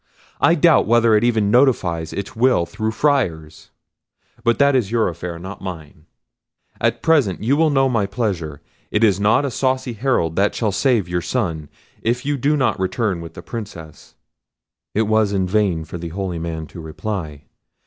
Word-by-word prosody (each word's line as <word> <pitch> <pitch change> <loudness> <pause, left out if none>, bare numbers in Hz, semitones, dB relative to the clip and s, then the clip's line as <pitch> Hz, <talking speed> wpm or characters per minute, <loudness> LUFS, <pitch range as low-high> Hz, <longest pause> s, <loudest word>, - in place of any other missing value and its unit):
I - - +4
doubt - - +4
whether 115 0 +4
it 105 +1 +4
even 110 -4 +2
notifies 90 - +2
its 100 -1 -6
will 120 -7 +3
through 110 +4 -3
Friars—but 115 - -3
that 140 -1 +4
is 120 -7 +1
your 115 -1 +1
affair, 85 0 -6
not 95 +4 -9
mine. 80 -4 -9 0.7
At - - 0
present 140 - +2
you 130 +5 +2
know 135 -2 +3
my 115 -6 0
pleasure; 100 - -2
and 70 - -16 0.3
it 105 - +1
is 100 -4 +4
not 105 +7 +3
a 140 - -2
saucy 130 0 -1
Herald 110 - 0
that 100 +1 +2
shall 110 -3 0
save 115 -3 +1
your 85 0 -1
son, 80 - -2 0.3
if 120 +3 -1
you 145 0 0
do 145 +3 +1
not 125 -8 +1
return 95 -1 -1
with 80 -1 -10
the - - -9
Princess." 90 -9 -9 0.8
It 110 - +3
was 110 -1 +2
in 95 -2 +1
vain 95 -5 0
for 85 +2 -7
the 85 0 -5
holy 90 -1 -4
man 80 -1 -4
to 85 - -12
reply. 80 -2 -5
105 Hz, 175 wpm, -20 LUFS, 85-120 Hz, 0.8 s, I